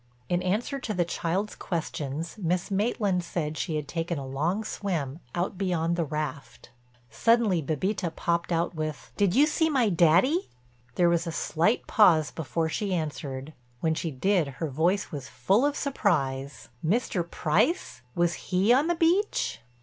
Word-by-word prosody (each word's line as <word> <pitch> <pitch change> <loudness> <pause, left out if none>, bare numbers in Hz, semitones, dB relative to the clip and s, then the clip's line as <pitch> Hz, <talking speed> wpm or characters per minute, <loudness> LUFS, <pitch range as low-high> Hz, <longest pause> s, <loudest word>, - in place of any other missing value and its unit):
In 175 0 +1
answer 215 +9 -1
to 220 -5 -3
the 175 -1 +2
child's 180 +5 -2
questions 160 -2 -4
Miss 180 +1 -1
Maitland 200 -3 +1
said 155 -3 -3
she 160 +1 -2
had 150 -2 -3
taken 165 +2 -2
a 140 - -5
long 160 +11 -1
swim, 165 -10 -3 0.2
out 180 +2 -2
beyond 170 -3 0
the 170 - 0
raft. 150 -3 -5 0.4
Suddenly 230 -7 +3
Bébita 170 +4 -2
popped 170 +1 -1
out 170 +1 0
with: 155 -2 -5
"Did 200 -3 +2
you 285 +4 +6
see 320 +1 +1
my 255 -7 +3
Daddy?" 185 - +3 0.5
There 175 - +4
was 170 0 +1
a - - -2
slight 170 +6 +1
pause 160 -9 +5
before 160 +2 -2
she 190 +4 -1
answered; 150 -3 -4 0.3
when 160 -1 +2
she 165 +1 -2
did 165 +4 +1
her 160 - -2
voice 175 +8 +1
was 140 -3 -6
full 185 - +2
of 290 - -2
surprise: 140 - -1
"Mr. 190 +1 +1
Price! 180 - 0
Was 170 0 +2 0.2
he 195 +5 +4
on 280 +5 +3
the 345 - +1
beach?" 340 - +1
175 Hz, 160 wpm, -27 LUFS, 155-205 Hz, 0.5 s, you